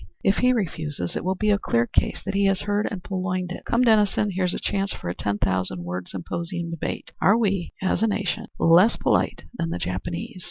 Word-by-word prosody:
If 195 0 +3
he 250 0 +4
refuses, 155 - -2
it - - -2
will 190 +1 0
be 210 +2 +1
a 200 - +3
clear 115 -10 +1
case - - 0
that 195 - -2
he 200 0 +2
has 195 -1 +2
heard 205 +1 0
and 185 -4 -6
purloined 185 -1 -2
it. - - -7
Come, 235 +2 +2
Dennison, 210 -3 +3
here's 185 -1 0
a - - -3
chance 195 0 -1
for - - -5
a - - -1
ten 100 0 -1
thousand 95 -2 -1
word 90 +1 -4
symposium 170 - -4
debate, 165 - -4
'Are 195 +7 +5
we, 195 -6 0
as 190 - +1
a 225 - +4
nation, 215 +1 -2
less 175 +7 +6
polite - - +1
than 165 -9 -2
the - - -2
Japanese?' 95 - -4
185 Hz, 215 wpm, -24 LUFS, 155-205 Hz, -, less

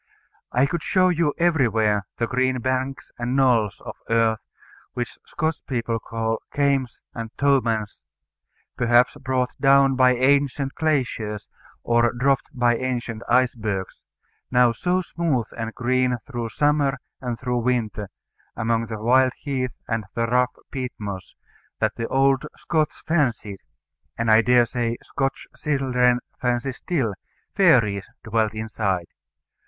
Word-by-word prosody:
I 125 +2 +3
could 170 +4 -2
show 185 -1 +3
you 165 -4 +1
everywhere 115 - +2
the 120 - +1
green 130 +1 0
banks 130 +2 -2
and 120 +2 -1
knolls 120 -7 +2
of - - -7 0.2
earth, 115 -1 +2 0.5
which 120 -1 -5
Scotch 155 0 -2
people 115 -3 -1
call 115 0 -3
"kames" 140 -3 0
and 115 -1 -5
"tomans" 115 -7 +1 0.8
perhaps 120 0 +4
brought 130 -2 -1
down 135 -1 +5
by 130 -1 +5
ancient 140 +1 +2
glaciers, 125 -9 -1 0.4
or 120 0 +3
dropped 135 +3 +1
by 120 -4 +2
ancient 120 -3 -3
icebergs 115 -6 0 0.5
now 125 -1 +4
so 180 +10 0
smooth 160 -9 -1
and 115 -1 -4
green 125 0 +1
through 120 -4 -4
summer 145 0 +1 0.2
and 125 -3 -4
through 125 -1 -1
winter, 115 -5 -1 0.5
among 115 0 0
the 110 - -5
wild 130 +4 +3
heath 130 -4 -3
and 115 -2 -2
the 115 0 +1
rough 125 +2 +1 0.2
peat 130 -2 -4
moss, 100 -3 -7 0.4
that - - 0
the 115 - -3
old 135 +2 +2
Scots 155 0 -1
fancied, 120 - 0 0.6
and 115 -1 +1
I 110 +1 +7
dare 125 0 +4
say 120 -1 -2
Scotch 135 -1 -2
children 125 -4 +1 0.2
fancy 125 +1 0
still, 130 - -2 0.4
fairies 115 - +3
dwelt 110 -1 0
inside. 100 -5 -2
125 Hz, 130 wpm, -23 LUFS, 115-135 Hz, 0.8 s, I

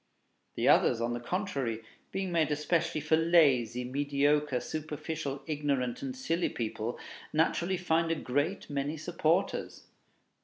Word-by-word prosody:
The - - 0
others, 115 - +5
on 120 +1 -1
the 120 - -3
contrary, 130 - -2 0.3
being 190 -1 -2
made 160 -3 +2
especially 155 +2 0
for 155 +2 +3
lazy, 140 -8 +4
mediocre, 145 +1 +1
superficial, 155 -1 -4
ignorant, 140 -5 -1
and 265 -1 -4
silly 175 -9 0
people, 115 0 -3 0.3
naturally 170 +4 +1
find 165 -1 +1
a 165 - +2
great 145 +7 -1
many 145 +2 -2
supporters. 170 +2 -1
150 Hz, 125 wpm, -30 LUFS, 135-165 Hz, 0.3 s, others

